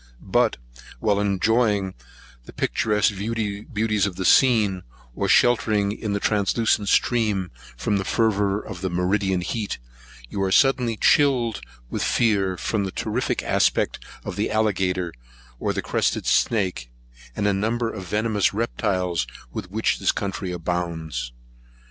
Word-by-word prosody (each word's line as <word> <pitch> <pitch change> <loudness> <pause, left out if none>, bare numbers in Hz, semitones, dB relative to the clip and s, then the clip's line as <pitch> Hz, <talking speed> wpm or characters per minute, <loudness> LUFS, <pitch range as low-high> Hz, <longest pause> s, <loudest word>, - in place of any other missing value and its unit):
But, - - +3 0.4
while 105 -2 +1
enjoying 105 0 +1 0.5
the - - -12
picturesque 105 -1 +1
beauties 105 0 -1
of 95 - -6
the 95 0 -3
scene, 110 -8 +4 0.3
or - - -2
sheltering 105 -4 +3
in 105 -1 -3
the 100 - 0
translucent 105 0 +1
stream 105 -7 +1 0.3
from 105 - 0
the 95 - -1
fervour 105 -2 +1
of 95 -4 -8
meridian 95 +1 0
heat, 105 +4 -3 0.5
you 100 - -4
are 95 -1 0
suddenly 125 -1 +3
chilled 125 -6 +3 0.3
with - - -2
fear, 100 -6 +1
from 105 +2 -1
the 95 - -3
terrific 115 +6 -2
aspect - - +1 0.2
of - - -5
the - - 0
alligator, 95 -5 0 0.5
or - - 0
crested - - -1
snake, 95 - +1 0.5
and 105 - -1
a 100 - +3
number 115 +4 -1
of 95 -4 -7
venomous 105 0 +1
reptiles, 95 - -1 0.3
with - - -5
which - - 0
this - - +2
country 95 -1 -4
abounds. 80 -7 -3
100 Hz, 130 wpm, -23 LUFS, 95-110 Hz, 0.5 s, scene